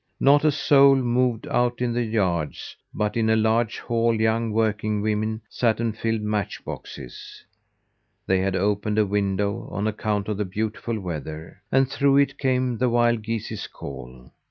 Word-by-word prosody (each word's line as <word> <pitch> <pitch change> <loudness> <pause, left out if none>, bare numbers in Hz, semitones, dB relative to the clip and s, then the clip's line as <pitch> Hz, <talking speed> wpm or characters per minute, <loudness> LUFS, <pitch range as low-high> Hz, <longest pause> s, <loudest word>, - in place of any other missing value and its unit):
Not 145 +2 +5
a 155 - +4
soul 140 -1 +5
moved 125 -2 +1
out 120 0 0
in 125 -1 0
the 120 - 0
yards; 95 -9 -2 0.2
but 105 -1 -2
in 110 -1 +1
a 110 - +4
large 110 +1 +1
hall 115 -1 0
young 110 +1 +1
working 110 -1 0
women 110 +1 -1
sat 115 -3 0
and 115 -2 -1
filled 115 -1 -1
match 105 -2 -3
boxes. 65 -4 -9 0.8
They 95 0 +2
had 95 0 0
opened 105 +2 0
a 110 - +4
window 100 0 -1
on 100 +3 -3
account 105 -1 -1
of 105 -2 -2
the 105 - -1
beautiful 110 +3 -3
weather, 80 0 -7
and 135 0 +4
through 140 +1 +2
it 140 0 +2
came 130 -3 0
the 125 0 +2
wild 120 -1 +2
geese's 115 0 -4
call. 65 -2 -10
110 Hz, 165 wpm, -24 LUFS, 100-120 Hz, 0.8 s, Not